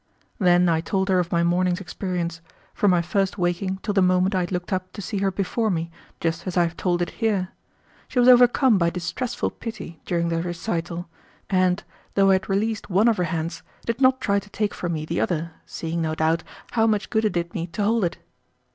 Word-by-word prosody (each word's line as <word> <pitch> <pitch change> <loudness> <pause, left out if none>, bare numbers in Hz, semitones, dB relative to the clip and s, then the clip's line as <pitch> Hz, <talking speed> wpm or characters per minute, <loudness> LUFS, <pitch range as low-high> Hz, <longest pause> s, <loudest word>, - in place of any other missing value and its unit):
Then 180 -2 +4
I 165 -1 +2
told 190 +3 -1
her 185 -1 +4
of 175 -1 -1
my 170 0 +2
morning's 175 +1 +2
experience, 175 -2 -4 0.3
from 205 - +2
my 175 -2 +3
first 195 +2 0
waking 180 +1 -1
till 210 - -1
the 195 - +3
moment 185 +1 +3
I 185 - +2
had 175 0 -2
looked 180 +2 -2
up 185 0 -2
to - - -9
see 205 +1 -3
her 195 0 +2
before 200 +4 -1
me, 165 -3 -2 0.3
just 165 +2 -2
as 185 - -2
I 175 - +5
have 170 0 -2
told 175 -1 0
it - - -4
here. 200 -5 +1 0.6
She 255 - -7
was 245 0 +5
overcome 245 -2 +6
by 170 -1 +3
distressful 180 +8 -3
pity 220 -8 -8
during 170 -1 0
the 165 0 0
recital, 175 0 -3 0.4
and, 185 -1 +2 0.3
though 195 -1 +5
I - - +6
had 190 +1 0
released 210 +3 -1
one 200 +5 +4
of 230 -2 +3
her 180 - +1
hands, 165 +1 -3 0.2
did 230 +3 -2
not 260 0 +5
try 200 -5 +1
to 205 - -15
take 210 0 -1
from 175 -1 -3
me 155 -1 -3
the 165 +2 -1
other, 165 -1 -1 0.2
seeing, 165 +1 -3
no 160 -1 -1
doubt, 160 +1 +1 0.3
how 225 -1 +3
much 215 -2 0
good 220 -1 +2
it 215 - +1
did 170 0 -2
me 175 -3 -3
to 190 +4 -3
hold 225 +1 +2
it. 170 - -1
185 Hz, 225 wpm, -24 LUFS, 170-205 Hz, 0.6 s, overcome